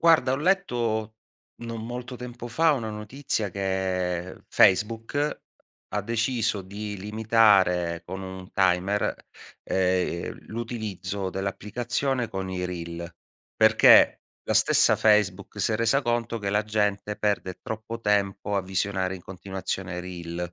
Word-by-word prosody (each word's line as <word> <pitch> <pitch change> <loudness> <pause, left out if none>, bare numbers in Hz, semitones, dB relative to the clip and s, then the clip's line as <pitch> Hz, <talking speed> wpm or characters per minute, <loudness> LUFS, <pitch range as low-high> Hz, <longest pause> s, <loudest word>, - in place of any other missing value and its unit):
Guarda, 165 -6 +5
ho - - +1
letto, 120 - 0 0.5
non 115 -1 -5
molto 125 +2 -6
tempo 120 -1 -8
fa, 160 +6 +3
una 115 -6 -2
notizia 105 0 -3
che 95 -2 -2
Facebook, 115 +9 +2 0.5
ha 105 +1 -1
deciso 115 -1 0
di 100 +2 -6
limitare 100 -5 +3
con 95 - -6
un 95 -1 -8
timer, 95 +2 +2 0.5
ehm, 90 -2 0
l'utilizzo 105 -5 -4
dell'applicazione 120 +6 -2
con 95 -1 -4
i 90 -1 -3
reel, 85 -1 -5 0.5
perché - - +6 0.3
la - - +1
stessa - - +5
Facebook 105 -2 +2
si 110 - +1
è - - +1
resa 115 +5 +2
conto 120 -1 -1
che 100 -2 -2
la 105 +1 +2
gente 105 -1 -1
perde 100 -3 -1
troppo 110 +1 -5
tempo 100 -1 0
a 100 - +1
visionare 95 0 -1
in 90 - -10
continuazione 95 -1 -5
reel. 85 -1 -6
105 Hz, 125 wpm, -26 LUFS, 95-115 Hz, 0.5 s, perché